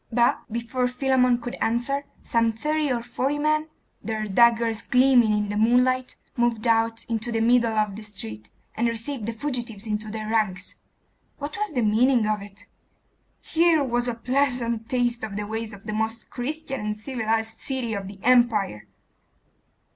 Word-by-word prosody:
But, 235 0 +1
before 235 +2 -1
Philammon 250 -1 +2
could 245 +1 -5
answer, 245 +5 0 0.2
some 230 -1 +2
thirty 300 +4 0
or 235 -2 -1
forty 270 +4 -1
men, 305 +1 +1 0.4
their 220 -1 -2
daggers 230 +1 +3
gleaming 250 -3 +4
in 210 -1 0
the 205 - -2
moonlight, 250 +3 +2 0.2
moved 240 -2 +1
out 225 0 +2
into 230 +1 -2
the 225 - 0
middle 230 -1 +3
of 210 -2 +1
the 215 - -8
street, 110 - -8 0.2
and 235 +2 0
received 230 0 -3
the - - 0
fugitives 235 -4 -4
into 215 0 -3
their 215 0 -5
ranks. 210 -4 0 0.6
What 295 +1 -5
was 420 -4 -3
the 245 - +2
meaning 230 +2 +3
of 215 -1 0
it? 200 +2 -12 0.8
Here 325 -2 +3
was 240 -2 0
a 240 - -1
pleasant 240 -2 0
taste 240 -2 0
of 215 -2 -4
the 210 0 -3
ways 220 +1 -4
of 200 -1 -11
the 215 - -4
most 220 +1 -3
Christian 270 +2 -4
and 210 0 -3
civilised 225 -2 -2
city 260 -4 -3
of 200 -2 -4
the 200 0 -9
Empire! 230 - +3
230 Hz, 165 wpm, -25 LUFS, 215-250 Hz, 0.8 s, gleaming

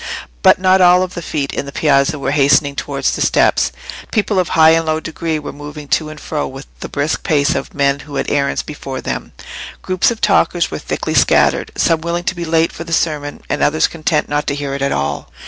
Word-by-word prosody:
But - - +6
not 185 0 +3
all 180 +1 +5
the 175 -1 -7
feet 145 -4 -3
in 140 - -3
the - - -6
Piazza 145 +2 +2
were 135 -1 -2
hastening 140 0 +3
towards - - -1
the - - -3
steps. - - +2 0.4
People 210 -3 +1
of 180 - 0
high 160 0 +7
and 165 0 +2
low 155 0 +1
degree 160 0 -3
were 150 -2 -7
moving 145 0 -9
to 155 -1 +1
and 155 0 -10
fro 150 -1 -3
with 135 +1 -9
the - - -7
brisk 145 +2 -1
pace 150 +1 +1
of - - -5
men 140 -1 +1
who 145 0 -10
had - - -2
errands 140 -1 0
before 135 -3 -6
them; 65 -1 -5 0.5
groups 185 -1 +2
of 235 -2 -4
talkers - - +2
were - - -4
thickly - - -3
scattered, - - +3
some 165 -1 +2
willing 170 +1 -2
to 180 - -1
be 170 -1 -4
late 165 0 +2
for 170 - -7
the 165 0 -6
sermon, 150 -3 -1
and - - -2
others 155 +2 +3
content 155 -2 -1
not 145 0 -2
to 140 - 0
hear 145 -1 -4
it 140 - -4
at 140 - 0
all. 70 +1 -2
150 Hz, 225 wpm, -17 LUFS, 140-165 Hz, 0.5 s, high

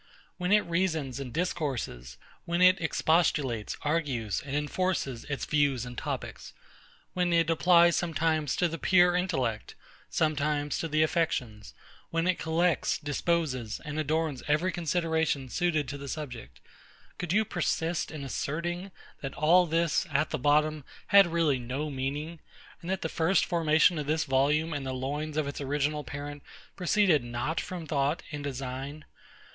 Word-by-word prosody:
When 180 0 -2
it 210 0 +6
reasons 160 -7 -1
and 135 -3 -6
discourses; 130 - -3 0.3
when 170 0 -1
it 185 0 +6
expostulates, 150 -8 +1
argues, 140 -9 -1
and 140 0 -4
enforces 150 -5 -1
its 140 -2 -3
views 140 -5 +1
and 125 0 -8
topics; - - -5 0.6
when 180 -1 +1
it 165 -1 +3
applies 170 0 +5
sometimes 160 -3 0
to 175 - +2
the 165 0 -5
pure 180 -1 +4
intellect, 130 - -1 0.3
sometimes 150 -1 0
to 165 - -2
the 155 0 +2
affections; 130 - -1 0.3
when 165 0 0
it 185 -1 +1
collects, 165 +1 +1
disposes, 145 -5 -1
and 150 +1 -4
adorns 155 -2 -1
every 155 +5 +2
consideration 160 -5 0
suited 155 -2 0
to 140 - -5
the 140 - -7
subject; 135 -6 -7 0.6
could 175 - -3
you 215 +3 +3
persist 170 -2 -1
in 155 -3 -7
asserting, 170 +7 -3 0.3
that 135 -1 -5
all 175 +4 +4
this, 165 +2 +1
at 150 +1 0
the - - -2
bottom, 150 +2 +2 0.3
had 200 -2 +7
really 165 -5 +1
no 135 +5 -4
meaning; 145 +5 -4 0.4
and 170 - -7
that 190 0 -1
the - - 0
first 165 +4 +2
formation 160 -1 +3
of 145 - -4
this 155 +1 +1
volume 150 +4 +1
in 145 -2 -3
the 130 -1 -3
loins 145 +4 -3
of 155 -2 0
its 145 - -5
original 145 +2 -1
parent 145 +1 -7 0.3
proceeded 180 -5 +3
not 120 +7 -2
from 180 -3 -6
thought 145 +1 0
and 145 -1 -5
design? 135 +2 -5
155 Hz, 150 wpm, -29 LUFS, 140-170 Hz, 0.6 s, had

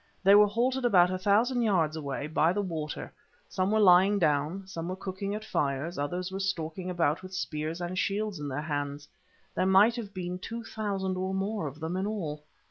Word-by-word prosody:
They 195 +1 +7
were 210 0 +8
halted 250 +5 0
about 180 -7 +5
a 185 - -2
thousand 225 +6 +2
yards 175 -9 +2
away, 145 -2 -4
by 155 +2 +2
the 205 - 0
water; 160 -5 -5 0.3
some 185 +1 -1
were 220 +1 +2
lying 195 +1 +6
down, 155 +2 0
some 170 -3 -6
were 185 - -3
cooking 195 +2 -4
at 215 0 -6
fires, 140 +4 -1
others 180 +6 -3
were 190 - -4
stalking 180 -2 -3
about 170 -3 +1
with 185 0 -9
spears 155 -2 -3
and 175 +1 -4
shields 205 -2 -1
in 145 - -4
their 140 +1 -3
hands; 145 -1 -3 0.5
there 185 - +1
might 200 +5 +5
have 215 -4 -5
been 180 -2 -5
two 230 +5 -6
thousand 195 -4 -3
or 190 +1 -2
more 195 -3 -2
of 145 +2 -8
them 160 +3 -3
in 190 +2 -1
all. 160 -9 -4
185 Hz, 205 wpm, -29 LUFS, 160-200 Hz, 0.5 s, were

